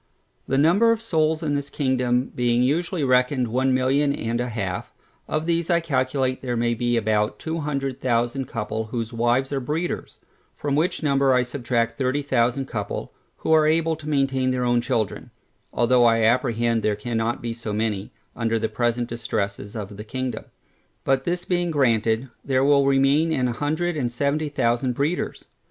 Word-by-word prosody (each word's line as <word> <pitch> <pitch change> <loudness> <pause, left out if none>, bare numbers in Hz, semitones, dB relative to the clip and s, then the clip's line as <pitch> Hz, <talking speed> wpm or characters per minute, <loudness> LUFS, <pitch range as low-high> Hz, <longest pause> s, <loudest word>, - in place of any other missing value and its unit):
The 135 - +1
number 180 +11 +5
of 230 - +1
souls 160 -7 0
in 150 -2 0
this 140 0 -2
kingdom 130 -3 0
being 120 0 +2
usually 165 +5 0
reckoned 125 -1 +2
one 130 +3 +1
million 135 +3 +2
and 115 +1 -2
a 125 - -2
half, 100 -5 -4 0.4
of 155 +1 -1
these 170 0 0
I 170 -1 +4
calculate 130 -4 0
there 125 -2 -2
may 120 0 +1
be 120 +1 0
about 105 -1 +1
two 165 +1 -4
hundred 140 -3 -3
thousand 120 +2 0
couple, 110 0 -3
whose 115 +1 -4
wives 120 +4 +1
are 140 - 0
breeders; 155 +7 -3 0.4
from 145 -1 -2
which 160 +2 0
number 140 -2 +3
I 125 - +3
subtract 120 -2 -2
thirty 135 +2 0
thousand 125 0 +1
couple, 105 -5 -4 0.3
who - - +1
are 155 -1 +5
able 165 +1 +2
to 155 -1 -7
maintain 135 -3 +1
their 125 -1 0
own 120 0 +2
children, 110 -4 -2 0.4
(although 120 +1 +3
I 115 -1 +4
apprehend 115 -1 +2
there 105 -1 +1
cannot 115 +2 -2
be 115 -1 -4
so 115 -2 -6
many 105 -2 -2 0.2
under 115 -1 0
the 110 0 -1
present 120 0 0
distresses 105 -3 -4
of 105 -2 -6
the 105 - -6
kingdom) 130 +3 -4 0.6
but 135 0 +1
this 175 0 -2
being 175 -1 0
granted, 115 -4 +1 0.2
there 130 -1 +1
will 140 -1 +4
remain 140 +4 +3
a 125 -4 0
hundred 155 +7 -1
and 125 -5 -1
seventy 145 +5 -1
thousand 125 -2 0
breeders. 145 +7 -2
130 Hz, 175 wpm, -23 LUFS, 115-145 Hz, 0.6 s, number